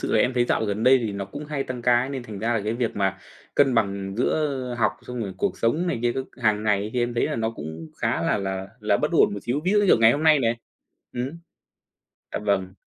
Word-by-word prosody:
sự -, -, -2 dB
là -, -, +4 dB
em 125 Hz, -, +2 dB
thấy 120 Hz, -1 st, +3 dB
dạo 115 Hz, -, +1 dB
gần 105 Hz, +1 st, -2 dB
đây 130 Hz, +1 st, +7 dB
thì 115 Hz, -4 st, -3 dB
nó 100 Hz, 0 st, -4 dB
cũng 145 Hz, +10 st, -8 dB
hay 145 Hz, -2 st, -2 dB
tăng 125 Hz, -2 st, -6 dB
ca 125 Hz, 0 st, +4 dB
ấy, 130 Hz, -, -2 dB
nên 135 Hz, -2 st, -4 dB
thành 110 Hz, -4 st, -8 dB
ra 115 Hz, +4 st, 0 dB
là 115 Hz, -, +1 dB
cái 110 Hz, -, 0 dB
việc 120 Hz, -3 st, -2 dB
mà 95 Hz, -1 st, 0 dB, 0.4 s
cân 135 Hz, -3 st, +4 dB
bằng 100 Hz, -3 st, 0 dB
giữa 130 Hz, -1 st, 0 dB
học 110 Hz, -, +2 dB
xong 125 Hz, -1 st, -6 dB
rồi 100 Hz, -4 st, -4 dB
cuộc -, -, -1 dB
sống 155 Hz, +10 st, +1 dB
này 175 Hz, -, -1 dB
kia 120 Hz, 0 st, +2 dB
cứ 130 Hz, +1 st, -3 dB
hằng 110 Hz, -3 st, +1 dB
ngày 105 Hz, -2 st, +2 dB
này 105 Hz, +2 st, -4 dB
kia, 125 Hz, -, 0 dB
em 120 Hz, 0 st, -2 dB
thấy 120 Hz, -, +1 dB
là -, -, -2 dB
nó 115 Hz, 0 st, 0 dB
cũng 80 Hz, -5 st, -8 dB
khá -, -, 0 dB
là -, -, +1 dB
là 95 Hz, -1 st, -3 dB
là 105 Hz, -1 st, +2 dB
bất -, -, -1 dB
ổn -, -, +4 dB
một 100 Hz, -, -5 dB
xíu, 130 Hz, +5 st, -1 dB
ví 185 Hz, -, +2 dB
dụ 210 Hz, -, +4 dB
như 205 Hz, -, +2 dB
kiểu 180 Hz, -, +6 dB
ngày 115 Hz, 0 st, +6 dB
hôm 145 Hz, -, -1 dB
nay 155 Hz, -2 st, +6 dB
nè. 120 Hz, -3 st, +1 dB, 0.6 s
Ừm. 125 Hz, +2 st, -2 dB, 1.0 s
À, -, -, -3 dB
vâng. 100 Hz, -3 st, 0 dB
115 Hz, 280 wpm, -24 LUFS, 100-130 Hz, 1.0 s, đây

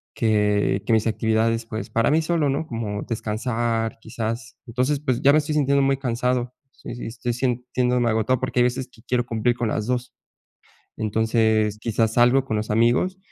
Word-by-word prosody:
que 105 Hz, -3 st, +1 dB
que 115 Hz, -, +2 dB
mis 110 Hz, 0 st, +2 dB
actividades, 115 Hz, +1 st, +1 dB
pues, 110 Hz, -2 st, -6 dB
para 115 Hz, +4 st, +2 dB
mí 160 Hz, +1 st, +3 dB
solo, 155 Hz, -3 st, +1 dB
¿no?, 150 Hz, +4 st, -2 dB
como 105 Hz, -3 st, -4 dB
descansar, 115 Hz, 0 st, -2 dB
quizás. 115 Hz, +1 st, -5 dB
Entonces, 130 Hz, +4 st, 0 dB
pues 130 Hz, -5 st, -1 dB
ya 140 Hz, -, +6 dB
me 155 Hz, -, +5 dB
estoy 150 Hz, 0 st, -2 dB
sintiendo 140 Hz, -1 st, +3 dB
muy 135 Hz, 0 st, +2 dB
cansado, 125 Hz, -1 st, -1 dB, 0.2 s
sí 120 Hz, -, -9 dB
sí, -, -, -7 dB
estoy 120 Hz, +1 st, -3 dB
sintiéndome 125 Hz, -1 st, 0 dB
agotado 110 Hz, +3 st, +1 dB
porque 130 Hz, -1 st, -1 dB
hay -, -, +6 dB
veces 125 Hz, +1 st, -1 dB
que 110 Hz, -, -19 dB
quiero 120 Hz, -1 st, +1 dB
cumplir 120 Hz, +1 st, 0 dB
con 120 Hz, -2 st, -2 dB
las 110 Hz, +1 st, -2 dB
2. 125 Hz, 0 st, -2 dB, 0.8 s
Entonces, 110 Hz, -1 st, +1 dB
quizás 115 Hz, 0 st, 0 dB
salgo 125 Hz, +2 st, +4 dB
con 110 Hz, -5 st, -2 dB
los 105 Hz, 0 st, -3 dB
amigos 120 Hz, -, +2 dB
120 Hz, 180 wpm, -23 LUFS, 110-130 Hz, 0.8 s, ya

